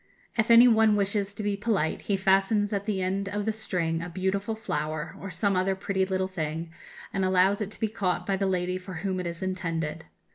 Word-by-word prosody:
If 220 Hz, 0 st, +1 dB
any 235 Hz, +1 st, +9 dB
one 220 Hz, -2 st, +5 dB
wishes 200 Hz, 0 st, 0 dB
to 210 Hz, -, -5 dB
be 205 Hz, -1 st, 0 dB
polite, 200 Hz, -6 st, 0 dB
he 200 Hz, -, 0 dB
fastens 195 Hz, +2 st, +2 dB
at 200 Hz, +1 st, -2 dB
the 195 Hz, -3 st, 0 dB
end 195 Hz, +2 st, -1 dB
of 205 Hz, 0 st, -2 dB
the 220 Hz, -, +1 dB
string 175 Hz, -7 st, -1 dB
a 170 Hz, -, -5 dB
beautiful 195 Hz, +4 st, -1 dB
flower, 155 Hz, -7 st, -3 dB
or 195 Hz, -, -5 dB
some 195 Hz, +3 st, 0 dB
other 190 Hz, +1 st, +1 dB
pretty 190 Hz, -1 st, -1 dB
little 190 Hz, 0 st, 0 dB
thing, 165 Hz, -2 st, -4 dB, 0.4 s
and 195 Hz, -, 0 dB
allows 190 Hz, +2 st, +3 dB
it 210 Hz, -, -2 dB
to -, -, -9 dB
be 220 Hz, -, +1 dB
caught 200 Hz, -4 st, -1 dB
by 195 Hz, -, +1 dB
the 195 Hz, 0 st, 0 dB
lady 180 Hz, 0 st, -1 dB
for 185 Hz, 0 st, -9 dB
whom 190 Hz, -1 st, -1 dB
it 180 Hz, -, -3 dB
is 170 Hz, +1 st, -4 dB
intended. 165 Hz, -4 st, -3 dB
190 Hz, 220 wpm, -27 LUFS, 180-205 Hz, 0.4 s, any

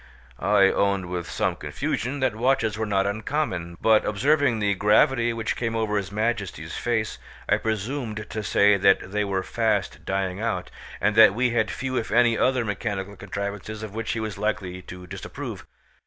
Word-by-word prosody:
I 100 Hz, 0 st, +4 dB
owned 100 Hz, -2 st, +1 dB
with 85 Hz, -2 st, -4 dB
some -, -, 0 dB
confusion 130 Hz, +4 st, -3 dB
that 130 Hz, -4 st, +2 dB
watches 115 Hz, -2 st, +1 dB
were 110 Hz, 0 st, -2 dB
not 100 Hz, -1 st, +1 dB
uncommon; 100 Hz, -, -2 dB
but 110 Hz, -1 st, +4 dB
observing 135 Hz, +3 st, +2 dB
the 105 Hz, -2 st, +1 dB
gravity 115 Hz, +5 st, +3 dB
which 115 Hz, -1 st, -2 dB
came 115 Hz, -1 st, -2 dB
over 110 Hz, -2 st, 0 dB
his 95 Hz, -4 st, -2 dB
Majesty's 105 Hz, -7 st, -2 dB
face 115 Hz, -3 st, -1 dB, 0.3 s
I -, -, +3 dB
presumed 110 Hz, 0 st, -3 dB
to 110 Hz, -, -4 dB
say 100 Hz, +1 st, +4 dB
that 95 Hz, 0 st, +3 dB
they 105 Hz, 0 st, 0 dB
were 95 Hz, -2 st, -1 dB
fast 115 Hz, 0 st, -1 dB
dying 95 Hz, -1 st, -2 dB
out, 95 Hz, -6 st, -2 dB, 0.3 s
and 105 Hz, +2 st, +1 dB
that 110 Hz, -3 st, +8 dB
we 125 Hz, +1 st, +2 dB
had 110 Hz, -3 st, +1 dB
few 130 Hz, +7 st, -3 dB
if 115 Hz, -, -2 dB
any 120 Hz, 0 st, +4 dB
other 125 Hz, 0 st, +2 dB
mechanical 100 Hz, -1 st, -3 dB
contrivances 100 Hz, +2 st, -5 dB
of 105 Hz, -2 st, -7 dB
which 115 Hz, 0 st, -2 dB
he 115 Hz, -, -2 dB
was 110 Hz, -3 st, -4 dB
likely 100 Hz, -4 st, -2 dB
to 90 Hz, 0 st, -10 dB
disapprove. 90 Hz, -, -7 dB
105 Hz, 175 wpm, -25 LUFS, 100-115 Hz, 0.3 s, that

